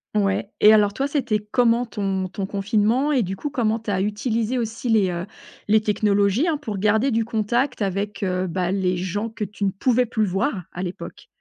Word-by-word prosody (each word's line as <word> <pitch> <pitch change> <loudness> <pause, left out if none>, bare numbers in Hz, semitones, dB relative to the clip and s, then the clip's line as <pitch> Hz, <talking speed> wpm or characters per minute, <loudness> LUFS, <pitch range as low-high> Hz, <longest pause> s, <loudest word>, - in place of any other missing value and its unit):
Ouais 200 -1 +1
et 210 - +8
alors 205 -1 +4
toi 270 +6 -1
c'était 255 -7 0
comment 240 -1 +3
ton 195 -4 -2
ton 195 +1 -4
confinement 215 +7 +1
et 260 -6 +2
du 190 +1 -4
coup 295 +10 -4
comment 225 -5 0
tu 225 -2 -5
as 190 -1 0
utilisé 220 +3 -1
aussi 230 +1 -3
les, 210 -4 +3
heu, 175 +1 -4 0.4
les 215 +1 +4
technologies, 205 - +2
hein, 320 -3 +1
pour 220 -9 -5
garder 220 +6 +2
du 225 -1 +1
contact 235 +3 -1
avec, 200 +1 -2
heu, 185 0 -1
ben, 180 +1 -1
les 185 -2 0
gens 205 +5 -3
que 220 - -5
tu 205 0 -4
ne - - +3
pouvais 250 +5 +2
plus 220 -2 0
voir 195 +2 -1
à 180 - -6
l'époque? 180 0 -7
210 Hz, 205 wpm, -23 LUFS, 195-230 Hz, 0.4 s, et